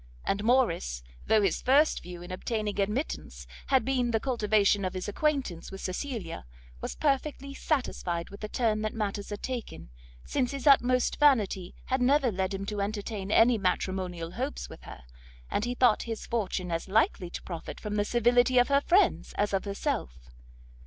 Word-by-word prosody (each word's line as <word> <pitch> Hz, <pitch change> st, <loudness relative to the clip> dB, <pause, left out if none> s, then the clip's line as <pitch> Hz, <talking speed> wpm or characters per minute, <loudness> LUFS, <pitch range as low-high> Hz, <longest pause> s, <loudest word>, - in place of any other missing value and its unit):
And 200 Hz, +1 st, 0 dB
Morrice, 215 Hz, -, +1 dB, 0.2 s
though 215 Hz, -1 st, +4 dB
his 195 Hz, -, +1 dB
first 285 Hz, +4 st, +4 dB
view 175 Hz, 0 st, -9 dB
in 175 Hz, -, -9 dB
obtaining 210 Hz, +2 st, -3 dB
admittance 210 Hz, +9 st, -2 dB, 0.2 s
had 265 Hz, -2 st, +3 dB
been 255 Hz, -2 st, +1 dB
the 225 Hz, -1 st, +1 dB
cultivation 210 Hz, -5 st, +2 dB
of 185 Hz, 0 st, -2 dB
his 185 Hz, -, -4 dB
acquaintance 255 Hz, -, -1 dB
with 195 Hz, -, -7 dB
Cecilia, 185 Hz, -, -5 dB, 0.3 s
was -, -, -4 dB
perfectly 280 Hz, -1 st, -1 dB
satisfied 190 Hz, -, -2 dB
with 200 Hz, -, -10 dB
the 215 Hz, -, -5 dB
turn 220 Hz, -3 st, 0 dB
that 215 Hz, +1 st, -3 dB
matters 205 Hz, -2 st, -3 dB
had 205 Hz, -, -6 dB
taken, 225 Hz, -, -5 dB, 0.3 s
since 255 Hz, -3 st, 0 dB
his 275 Hz, -2 st, -5 dB
utmost 255 Hz, -3 st, +4 dB
vanity 215 Hz, -11 st, +3 dB
had 260 Hz, 0 st, 0 dB
never 265 Hz, 0 st, +3 dB
led 190 Hz, 0 st, -1 dB
him 195 Hz, 0 st, -4 dB
to 205 Hz, 0 st, -3 dB
entertain 205 Hz, -1 st, -3 dB
any 230 Hz, +2 st, +5 dB
matrimonial 180 Hz, -2 st, -2 dB
hopes -, -, -4 dB
with -, -, -11 dB
her, -, -, -10 dB, 0.5 s
and 210 Hz, -, 0 dB
he 245 Hz, +1 st, -2 dB
thought 245 Hz, -4 st, +4 dB
his 225 Hz, -2 st, -5 dB
fortune 190 Hz, -5 st, -2 dB
as 165 Hz, +2 st, -2 dB
likely 190 Hz, -3 st, +1 dB
to -, -, -7 dB
profit 170 Hz, -3 st, -7 dB
from 210 Hz, -1 st, -5 dB
the 205 Hz, 0 st, +1 dB
civility 245 Hz, +3 st, +3 dB
of 245 Hz, +2 st, +5 dB
her 280 Hz, 0 st, +4 dB
friends 340 Hz, -, +2 dB
as 205 Hz, 0 st, 0 dB
of 195 Hz, -, 0 dB
herself. 65 Hz, -, -3 dB
210 Hz, 175 wpm, -29 LUFS, 190-250 Hz, 0.5 s, any